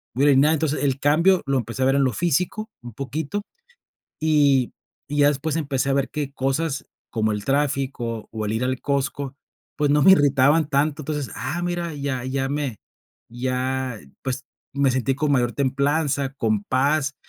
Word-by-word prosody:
muy 135 - +1
ordenada. 145 +2 +5
Entonces, 155 -2 -1
el 135 -1 +1
cambio 170 +6 +3
lo 135 -1 +2
empecé 115 0 -4
a - - +3
ver 135 +1 +3
en 140 -1 +3
lo 130 - 0
físico, 180 +6 0
un 120 -1 -9
poquito. 145 - -4 0.8
Y 145 -5 +3 0.4
y 145 0 -3
ya 145 0 +6
después, 145 +1 -1
empecé 140 -4 -1
a - - +2
ver 135 -1 0
que 145 -2 -4
cosas, 135 +2 -1 0.2
como 110 -1 0
el 105 -1 -4
tráfico, 135 -4 -1
o 110 -1 -3
el 105 - -1
ir 115 +3 0
al 130 0 -1
Costco, 140 -1 -2 0.4
pues, 145 -1 +1
no 150 0 +4
me 190 - +7
irritaban 145 -1 +4
tanto. 150 +1 +1
Entonces, 145 -4 -3
ah, 165 +7 -3
mira, 175 -2 -2
ya 140 -3 -3
ya 135 +1 -1
me 140 -7 -2 0.5
ya, 130 -1 -2 0.2
pues, 130 0 -3 0.3
me 140 -1 +3
sentí 130 +1 0
con 145 0 +1
mayor 120 -3 +2
templanza, 140 +1 0
con 110 -6 0
paz, 140 +3 +1
140 Hz, 175 wpm, -23 LUFS, 130-150 Hz, 0.8 s, me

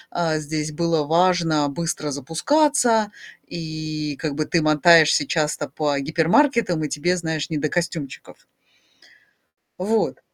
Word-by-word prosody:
э, 160 -3 0
здесь 155 0 -4
было 165 -1 0
важно 165 -2 +2
быстро 150 0 -3
запускаться, 225 - +1 0.4
и 155 -2 -5
как 150 -3 -3
бы 155 - -1
ты 170 0 0
мотаешься 155 -1 +5
часто 155 -1 -1
по 145 -2 -2
гипермаркетам, 170 - +1
и - - -4
тебе, 175 +6 -1
знаешь, 160 -3 -3
не 160 - -2
до 150 +1 -1
костюмчиков. 165 -3 -5 1.3
Вот. 215 +4 -1
160 Hz, 120 wpm, -22 LUFS, 150-175 Hz, 1.3 s, мотаешься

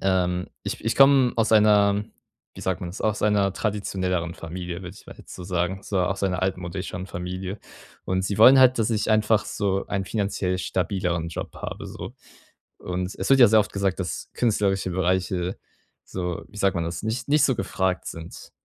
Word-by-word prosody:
ähm, 90 -2 +1 0.2
ich - - -5
ich 115 - 0
komm 135 -2 +6
aus 115 -1 +2
einer 105 -1 +4 0.5
wie - - -8
sagt 95 -3 -1
man 90 -1 -5
das 95 - -9
aus 110 -1 0
einer 100 -2 +2
traditionelleren 95 -5 -2
Familie, 85 +1 -6
würde 90 +1 -9
ich - - -18
mal - - -11
jetzt - - -12
so 90 - -8
sagen. 90 +1 -1
So 95 -2 -1
aus 95 +2 -1
einer 90 -1 -1
altmodischen 90 0 -3
Familie. 90 +3 -5 0.5
Und 95 0 -1
sie 100 - -2
wollen 130 +5 +9
halt, 130 -1 +6
dass 110 - +1
ich 110 -1 0
einfach 110 0 +3
so 100 -1 -1
einen 100 -1 -2
finanziell 100 -3 -1
stabileren 90 -2 -1
Job 80 - -6
habe - - -6
so. - - -8 0.6
Und 90 +1 -4
es - - -3
wird 135 - +6
ja 120 - +10
sehr 110 0 +6
oft 105 - -3
gesagt, 100 -1 -1
dass 90 - -4
künstlerische 100 -5 +1
Bereiche 90 0 0 0.5
so 90 -2 -4
wie - - -16
sagt 100 -1 +2
man 85 - -1
das, 85 0 -5
nicht 115 +4 -3
nicht 150 +1 +4
so 130 - +3
gefragt 95 -1 -1
sind, 80 0 -9
95 Hz, 190 wpm, -24 LUFS, 90-105 Hz, 0.6 s, ja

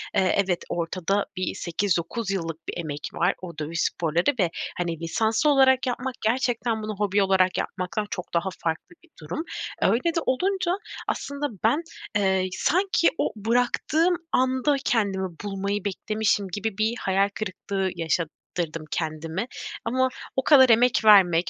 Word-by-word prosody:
eee, 185 - +3
evet 180 -2 -1
ortada 185 +4 -1
bir 185 - -2
8-9 185 +4 -1
yıllık 165 -4 -4
bir - - -3
emek 150 -3 -4
var, 175 +3 +2
o 170 -4 -8
dövüş 160 +2 -2
sporları 170 - +1
ve, 180 -4 +3 0.3
hani, 170 -2 -2
lisanslı 220 - +1
olarak 265 -2 +5
yapmak 255 +1 -2
gerçekten 235 -1 0
bunu 215 0 -4
hobi 205 0 +2
olarak 190 -1 +3
yapmaktan 195 +3 -3
çok 180 - -6
daha 170 +3 +1
farklı 165 - -3
bir 340 - -22
durum. 165 - -4 0.4
Öyle 295 +9 +2
de - - +3
olunca 370 +6 +1 0.4
aslında 280 +1 -2 0.2
ben, 235 +9 +3 0.3
eee, 190 -2 +2
sanki 370 +1 +3
o - - 0
bıraktığım 245 - +1 0.2
anda 260 +3 +2
kendimi 195 -5 +1 0.2
bulmayı 200 0 -2
beklemişim 205 0 0
gibi 205 +2 -3
bir 220 +2 +1
hayal 195 +1 +2
kırıklığı 195 -1 -2
yaşattırdım 165 -1 -3
kendime 160 +5 -3 0.4
ama 260 +3 +2 0.3
o 265 - +1
kadar 265 -4 +7
emek 235 +2 +5
vermek, 180 -5 +6
200 Hz, 140 wpm, -25 LUFS, 175-245 Hz, 0.4 s, kadar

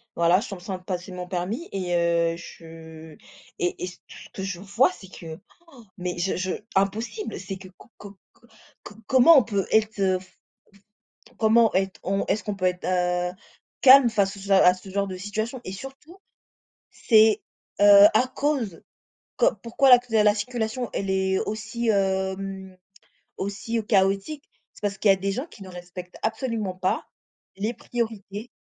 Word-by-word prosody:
voilà, 170 +2 +4
je - - -6
suis 200 - -7
en - - -6
train 185 +1 -6
de 185 - -20
passer 180 0 -5
mon 180 0 -6
permis 195 - -4
et 180 -3 -2
heu, 170 -1 +1
je 160 -2 -12 0.4
et 175 - -2
et - - -2
ce 180 - -10
ce - - -13
que 190 - -6
je 195 -2 -4
vois, 205 - +2
c'est 200 - -13
que, 160 -2 -9 0.4
oh, 235 - -15
mais 180 -1 -4
je 180 +2 -1
je 185 0 -2 0.2
impossible 215 - -2
c'est 190 +1 -6
que 190 0 -12
co - - -17
co 200 -1 -12 0.2
co - - -25 0.4
co - - -11
comment 265 +5 +7
on - - +5
peut 205 -4 -2
être, 220 0 +2
fe 190 -2 +1
fe 185 - -20 1.0
comment 225 0 +4
être 190 0 -1
on, 195 +1 -1
est-ce 205 0 0
qu'on 205 +1 -4
peut 185 -2 -3
être, 180 0 -1
heu, 180 -1 0 0.5
calme 265 -2 +8
face 200 -3 0
à - - -11
ce 200 +1 -6
à 190 -2 +6
ce 185 +1 -12
genre 200 +1 -1
de 190 - -6
situation 215 +6 -4
et - - -6
surtout, 270 - -11 0.7
c'est, 220 -2 +4 0.4
heu, 205 0 +9
à 250 +4 +4
cause, 265 - -2 0.6
qu - - +4 0.2
pourquoi 240 +4 +2
lacus 245 -1 +6
la 210 -2 +4
circulation, 235 +1 -3
elle 195 - -3
est 190 0 +1
aussi, 230 +2 -4
hem, 190 -1 -1 0.6
aussi, 200 +4 -3
heu, - - -1
chaotique? 200 +7 0 0.3
C'est - - -18
parce 205 -1 -2
qu'il 205 - +2
y 195 - +8
a - - +1
des 195 +1 -2
gens 255 +9 -3
qui 205 -11 -13
ne 190 - -11
respectent 180 0 -10
absolument 220 -4 -2
pas 185 0 -1 0.5
les 215 +4 -2
priorités, 225 -2 -5
195 Hz, 180 wpm, -24 LUFS, 185-225 Hz, 1.0 s, heu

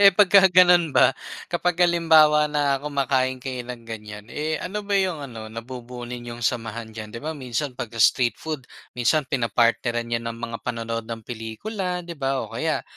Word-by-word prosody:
Eh, 200 -1 +9
pagka 195 0 +6
gano'n 175 -3 +6
ba 135 - +4 0.3
kapag 175 0 -1
halimbawa 155 -3 +5
na 145 -2 +1
kumakain 135 -3 0
kayo 125 -1 -5
ng 125 -1 -8
ganyan, 105 -2 -8
eh, 155 +1 -2
ano 210 +2 -4
ba 200 -1 +1
yung 185 -6 -1
ano 115 -5 -8
nabubuo 120 +1 -8
ninyong 120 -1 -7
samahan 115 -1 -2
diyan? 105 -1 -8
'Di 115 - -5
ba 155 - -3
minsan 130 0 -3
pagka 115 -1 -5
street 120 +2 +4
food 155 -5 -5 0.3
minsan 125 +6 +2
pinapartneran 120 -1 +1
yan 115 0 -2
ng 115 - -4
mga 115 -1 -4
panonood 115 -2 -3
ng 115 -1 -6
pelikula 180 - -4
'di 170 -1 -8
ba 135 -1 0
o - - -8
kaya - - -1
130 Hz, 175 wpm, -24 LUFS, 115-160 Hz, 0.3 s, Eh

